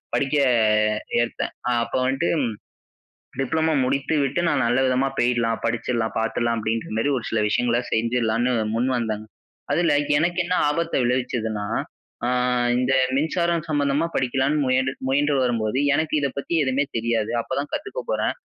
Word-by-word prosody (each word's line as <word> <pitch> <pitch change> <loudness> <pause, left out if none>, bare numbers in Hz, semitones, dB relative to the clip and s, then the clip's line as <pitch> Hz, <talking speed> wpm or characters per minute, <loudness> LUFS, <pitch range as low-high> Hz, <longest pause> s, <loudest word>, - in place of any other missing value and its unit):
படிக்க 140 +1 0 0.9
ஏற்தேன். 120 - -3 0.2
அ - - +2
அப்ப 115 - -5
வந்துட்டு 135 +6 0 1.1
டிப்ளமோ 160 +3 +1
முடித்து 140 +4 0
விட்டு 140 +5 0
நான் - - +1
நல்ல 120 +2 +2
விதமா 130 +1 +1
போயிடலாம் 120 -2 +1
படிச்சிடலாம் 115 -1 -2
பார்த்துடலாம் 115 +1 0
அப்டின்ற 110 +1 -2
மாரி 145 +5 +1
ஒரு 115 - -5
சில 110 - +1
விஷயங்கள 120 +1 +1
செஞ்சிடலாம்னு 115 +1 +1 0.2
முன் 120 +3 +1
வந்தங்க. 110 -2 -3 0.5
அதுல 170 -3 +2 0.3
எனக்கு 175 +2 0
என்ன 180 +1 0
ஆபத்த 165 +3 -1
விளைவிச்சதுன்னா, 120 -4 -1 0.6
அ - - +1 0.5
இந்த 125 +1 +1 0.2
மின்சாரம் 170 +3 0
சம்மந்தமா 145 +1 +1
படிக்கலாம்னு 135 +3 +1
முயன் 130 +1 +1 0.2
முயன்று 145 +2 +2
வரும்போது 115 0 0 0.2
எனக்கு 155 +1 -1
இத 140 - +1
பத்தி 140 - -4
எதுவுமே 130 +2 +1
தெரியாது. 115 -1 0
அப்போ - - -7
தான் 145 +1 -5
கத்துக்க 415 +11 -4
போறேன். - - 0
130 Hz, 145 wpm, -23 LUFS, 115-145 Hz, 1.1 s, அ